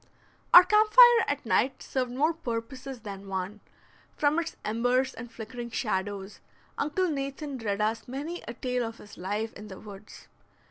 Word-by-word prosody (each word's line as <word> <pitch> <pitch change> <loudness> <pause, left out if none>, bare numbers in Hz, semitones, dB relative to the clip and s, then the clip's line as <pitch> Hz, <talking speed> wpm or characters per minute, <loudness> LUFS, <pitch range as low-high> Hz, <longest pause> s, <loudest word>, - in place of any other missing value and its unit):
Our 355 - +11
camp 425 +3 +4
fire 485 -2 +8
at 285 -2 -2
night 255 +4 +1
served 255 -2 -2
more 300 +6 +1
purposes 255 -2 -6
than 200 -2 -8
one; 190 +2 -4 0.6
from 300 +2 +2
its 330 -1 -4
embers 245 +4 +1
and 230 0 -9
flickering 235 +1 -7
shadows, 200 -3 -3 0.4
Uncle 305 +6 0
Nathan 275 -2 -4
read 205 -2 -2
us 220 +1 -1
many 295 +7 -5
a 235 - -6
tale 250 0 -1
of 225 0 -5
his 205 - -13
life 205 +5 -3
in 210 - -10
the 190 -2 -10
woods. 205 -1 -12
245 Hz, 160 wpm, -28 LUFS, 210-285 Hz, 0.6 s, Our